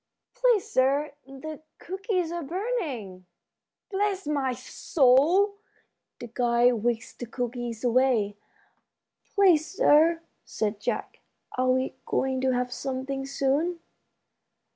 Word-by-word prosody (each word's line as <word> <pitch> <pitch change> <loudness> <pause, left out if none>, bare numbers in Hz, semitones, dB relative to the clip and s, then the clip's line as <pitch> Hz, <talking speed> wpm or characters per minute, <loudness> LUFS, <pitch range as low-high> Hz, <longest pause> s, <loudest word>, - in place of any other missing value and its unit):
"Please, - - +2
sir, 275 +3 +2 0.2
the 290 +3 -8 0.2
cookies 375 -2 -2
are 345 0 -3
burning." 285 - -4 0.6
"Bless 395 -2 -1
my 280 -3 0
soul!" 290 +10 +3 0.6
The - - -6
guide 240 0 +2
whisked 240 -1 -2
the 245 - -5
cookies 240 -1 -4
away. 240 -4 +2 1.0
"Please, 360 -7 +4
sir," 330 -6 +5 0.2
said 210 -1 -3
Jack, - - -3 0.4
"are 255 0 +1
we 260 +1 +1
going 265 -1 0
to 265 - +2
have 250 0 -1
something 270 0 -4
soon?" 280 +6 0
270 Hz, 105 wpm, -27 LUFS, 245-340 Hz, 1.0 s, sir